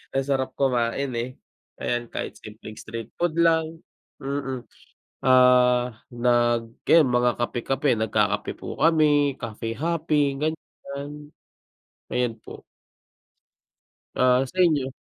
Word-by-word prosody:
Ang 135 - +2
sarap 135 -1 -1
kumain 130 0 0
eh. 120 +2 -2 0.5
Ayan 120 -1 -2
kahit - - -5
simpleng 110 0 -11
street 115 0 -7
food 170 -2 0
lang 165 -1 +2 0.4
mm 135 -2 -4 0.6
ah, 125 -2 +5 0.2
nag 120 -1 +2 0.2
yan 160 -4 +6
mga 125 0 +3
kape-kape 130 +4 -1
nagkakape 105 -2 0
po - - -7
kami, 150 -4 +3
cafe 115 -1 -5
hopping, 150 -1 0
ganyan. 150 -1 -6 0.8
Ayan 120 -2 0
po. - - -12 1.5
Ah, 125 0 +4
sa 185 - -15
inyo? 145 -6 +1
130 Hz, 110 wpm, -24 LUFS, 120-150 Hz, 1.5 s, yan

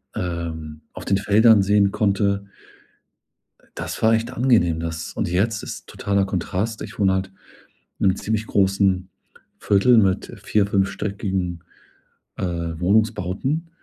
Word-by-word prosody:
ähm, 80 -3 -5
auf - - -9
den 100 - +2
Feldern 105 +1 +5
sehen 100 0 +3
konnte. 100 -1 0 1.3
Das - - -5
war 110 0 +5
echt 115 +2 -1
angenehm 115 -11 +2
das 80 0 -5
und - - -2
jetzt 105 +5 0
ist - - -8
totaler 100 -1 0
Kontrast. 95 +4 -3
Ich - - -8
wohne 95 -2 +3
halt 95 0 0 0.7
in - - +4
'nem 95 - +1
ziemlich 110 0 -2
großen 95 -1 +2 0.5
Viertel 110 +4 +4
mit 95 -3 +1
vier 105 -2 +2
fünfstöckigen, 95 -3 -2 0.7
äh, - - -6
Wohnungsbauten. 90 - -1
100 Hz, 125 wpm, -22 LUFS, 90-105 Hz, 1.3 s, Feldern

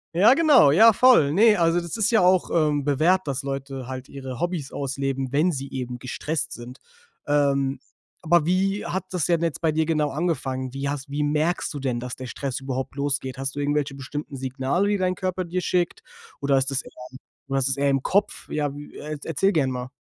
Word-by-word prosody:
Ja, 210 +8 +7
genau. 290 - +6
Ja, 225 +7 +7
voll. 215 - +5
Ne, 210 +3 +5
also, 170 +1 +2
das 170 +5 -6
ist 220 0 +1
ja 220 - +4
auch, 180 0 +3
ähm, 150 -3 +1
bewährt, 160 +5 +2
dass 135 -1 -2
Leute 135 -2 -5
halt 130 0 -6
ihre 130 -3 -8
Hobbys 175 -6 -3
ausleben, 135 -1 -3
wenn 160 +5 +3
sie 140 -2 -5
eben 125 -2 -5
gestresst 155 +5 -4
sind. 120 +2 -10 0.5
Ähm, 140 -2 +1 0.4
aber 170 -2 +3
wie 195 +3 0
hat 190 0 -3
das 180 -4 -1
denn 170 -2 +1
jetzt 165 -3 -2
bei 160 -2 +2
dir 160 0 +1
genau 150 -2 +1
angefangen? 135 -5 -2
Wie 140 +1 -3
hast 140 0 -5
wie 145 +1 -1
merkst 155 +3 0
du 145 - -5
denn, 125 -3 -2
dass 125 0 -6
der 130 - -8
Stress 135 +1 -4
überhaupt 135 0 -4
losgeht? 140 -2 -2
Hast 135 +1 -4
du - - -4
irgendwelche 145 -1 -1
bestimmten 140 +1 -6
Signale, 135 +9 -1
die 205 - +1
dein 185 -1 0
Körper 185 0 -2
dir 180 +1 -3
schickt 175 -1 -1 0.4
oder 140 -1 +2
ist 135 +1 0
das 135 - -1
eher - - -14 0.6
oder 135 0 0
ist 130 - 0
das 135 0 -1
eher 140 0 +2
im 135 -1 +1
Kopf? 205 +2 0
Ja, 145 -2 -1
w 145 0 -9
äh, 150 +1 -6
e - - -5
erzähl 195 +6 +1
gern 145 -7 +1
mal. 125 0 -5
145 Hz, 215 wpm, -24 LUFS, 135-175 Hz, 0.6 s, Ja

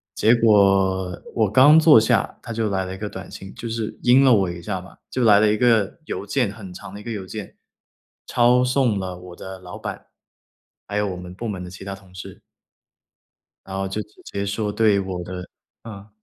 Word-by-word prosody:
结 110 +2 +4
果 95 -5 +3
我 110 -4 +2
刚 145 +7 +7
坐 155 -7 +8
下， 110 - 0
他 115 - -7
就 110 -1 -1
来 95 -1 -1
了 95 +1 -6
一 - - -10
个 105 +1 -5
短 95 -1 -9
信， 95 0 -10
就 115 - -7
是 115 -1 -4
阴 130 +3 +5
了 130 -3 +6
我 95 -4 +2
一 85 0 -7
下 95 -1 -3
嘛。 95 - -14
就 130 -2 0
来 105 -2 +6
了 105 -1 +4
一 105 - +1
个 115 - +2
邮 100 - -5
件， 120 0 0
很 95 -4 -10
长 95 - -10
的 105 - -8
一 - - -13
个 115 - -6
邮 100 -3 -5
件， 105 +1 -8 0.7
抄 125 +1 +3
送 125 -4 +1
了 90 -2 -4
我 90 -1 -11
的 95 0 -9
老 90 -1 -10
板， - - -7 0.8
还 100 - -5
有 105 - +1
我 90 -2 -4
们 90 0 -9
部 115 +3 -5
门 95 -3 -5
的 90 - -8
其 95 +1 -11
他 100 0 -5
同 95 -1 -19
事。 90 - -10 1.2
然 95 - -7
后 95 0 -2
就 105 +3 -3
直 105 - -15
接 100 0 -4
说 105 +1 -2
对 105 -2 +3
我 95 -2 -4
的 90 0 -7 0.4
嗯。 105 -2 -10
100 Hz, 235 characters per minute, -22 LUFS, 95-115 Hz, 1.2 s, 坐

